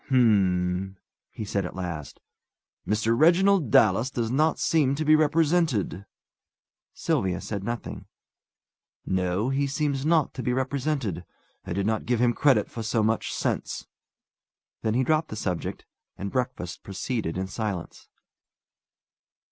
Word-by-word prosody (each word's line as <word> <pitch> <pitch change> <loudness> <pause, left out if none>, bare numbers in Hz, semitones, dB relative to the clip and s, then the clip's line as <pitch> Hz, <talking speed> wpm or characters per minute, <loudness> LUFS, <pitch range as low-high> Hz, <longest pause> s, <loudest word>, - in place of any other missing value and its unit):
"H'm!" 95 -7 +2 0.3
he 110 - -6
said, 100 0 -1
at 90 - -6
last. 85 -6 -5 0.7
"Mr. 110 +2 +1
Reginald 175 - +4
Dallas 110 +4 +4
does 120 -3 -2
not 155 +4 +2
seem 145 -4 +2
to 155 +2 -2
be 155 +1 +6
represented." 155 - +1 0.9
Sylvia 105 - 0
said 100 -3 -5
nothing. 120 +3 -5 1.0
"No; 95 +5 0
he 140 +1 +1
seems 140 0 -1
not 160 -1 +2
to - - -5
be 125 +1 0
represented. 130 - -1 0.4
I - - -2
did 100 +2 -1
not 110 +1 -1
give 120 -1 +1
him 120 0 +3
credit 140 0 +3
for 115 - -7
so 110 0 0
much 110 +1 0
sense." - - -2 1.0
Then 110 0 0
he 130 - +3
dropped 155 +3 +1
the - - -5
subject, 90 -5 -3 0.3
and 100 0 -4
breakfast 125 -9 -3
proceeded 100 -2 -3
in 95 - -1
silence. 100 -2 -5
115 Hz, 135 wpm, -26 LUFS, 95-140 Hz, 1.0 s, be